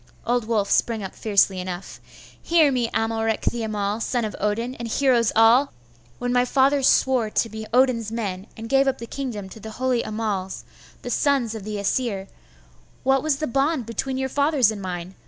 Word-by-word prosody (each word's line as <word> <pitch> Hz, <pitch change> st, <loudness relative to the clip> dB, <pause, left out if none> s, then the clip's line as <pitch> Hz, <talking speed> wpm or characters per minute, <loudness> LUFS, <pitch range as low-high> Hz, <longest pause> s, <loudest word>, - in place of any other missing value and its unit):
Old 240 Hz, -2 st, 0 dB
Wulf 210 Hz, -4 st, 0 dB
sprang 225 Hz, -3 st, +1 dB
up 190 Hz, -, -6 dB
fiercely 200 Hz, -3 st, +2 dB
enough. 180 Hz, 0 st, -6 dB, 0.4 s
'Hear 325 Hz, -4 st, +4 dB
me, 245 Hz, -3 st, 0 dB
Amalric 225 Hz, 0 st, 0 dB
the 235 Hz, -, -1 dB
Amal, 210 Hz, -1 st, -2 dB
son 240 Hz, -1 st, -1 dB
of 215 Hz, -, -5 dB
Odin, 225 Hz, +4 st, -1 dB
and 235 Hz, -, -4 dB
heroes 240 Hz, -1 st, +2 dB
all! 230 Hz, +5 st, +5 dB, 0.4 s
When 245 Hz, 0 st, -2 dB
my 245 Hz, 0 st, +4 dB
fathers 270 Hz, +2 st, +3 dB
swore 255 Hz, -5 st, +2 dB
to 230 Hz, -, 0 dB
be 220 Hz, 0 st, -7 dB
Odin's 240 Hz, -3 st, +2 dB
men, 200 Hz, -4 st, -4 dB
and 225 Hz, 0 st, -7 dB
gave 270 Hz, +2 st, +3 dB
up 265 Hz, -1 st, +1 dB
the 230 Hz, -, -7 dB
kingdom 230 Hz, -6 st, -5 dB
to 220 Hz, -, -11 dB
the 220 Hz, +1 st, -8 dB
holy 255 Hz, -2 st, +1 dB
Annals, 210 Hz, -3 st, -3 dB, 0.4 s
the -, -, -4 dB
sons 275 Hz, -6 st, +1 dB
of 220 Hz, -3 st, -7 dB
the 215 Hz, -1 st, -4 dB
Aesir, 200 Hz, -1 st, -1 dB, 0.8 s
what 270 Hz, 0 st, +3 dB
was 310 Hz, -1 st, +1 dB
the 310 Hz, -, -2 dB
bond 275 Hz, 0 st, 0 dB
between 260 Hz, +4 st, -3 dB
your 265 Hz, 0 st, -1 dB
fathers 280 Hz, -4 st, +2 dB
and 210 Hz, -2 st, -6 dB
mine? 180 Hz, -1 st, -5 dB
230 Hz, 190 wpm, -23 LUFS, 210-260 Hz, 0.8 s, all